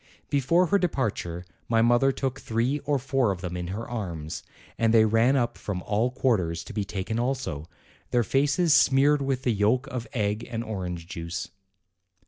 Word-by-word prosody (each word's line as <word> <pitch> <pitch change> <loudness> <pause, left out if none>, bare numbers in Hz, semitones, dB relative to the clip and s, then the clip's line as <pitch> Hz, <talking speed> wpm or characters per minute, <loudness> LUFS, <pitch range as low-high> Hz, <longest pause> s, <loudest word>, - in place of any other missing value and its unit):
Before 145 +6 +3
her 200 +4 +2
departure 105 - -2 0.2
my 115 -1 +3
mother 120 +3 +4
took 135 0 -3
three 120 +6 0
or 145 -1 +2
four 135 -4 +1
of 90 -2 -5
them 90 -1 -4
in 90 -1 -4
her 105 +6 -5
arms, 85 -10 -5 0.3
and 115 -1 +2
they 110 -1 +6
ran 115 +5 +3
up 120 -3 0
from 90 -4 -4
all 110 +4 +1
quarters 95 -11 0
to 85 - -10
be 105 -1 -1
taken 100 +3 -3
also, 120 - -2 0.4
their 120 -1 +2
faces 145 - +2
smeared 140 +2 +4
with 135 -1 -2
yolk 115 +3 +2
of 125 -2 -5
egg 105 -2 -1
and 115 0 -3
orange 90 -6 -5
juice. 85 +1 -5
115 Hz, 170 wpm, -26 LUFS, 95-135 Hz, 0.4 s, they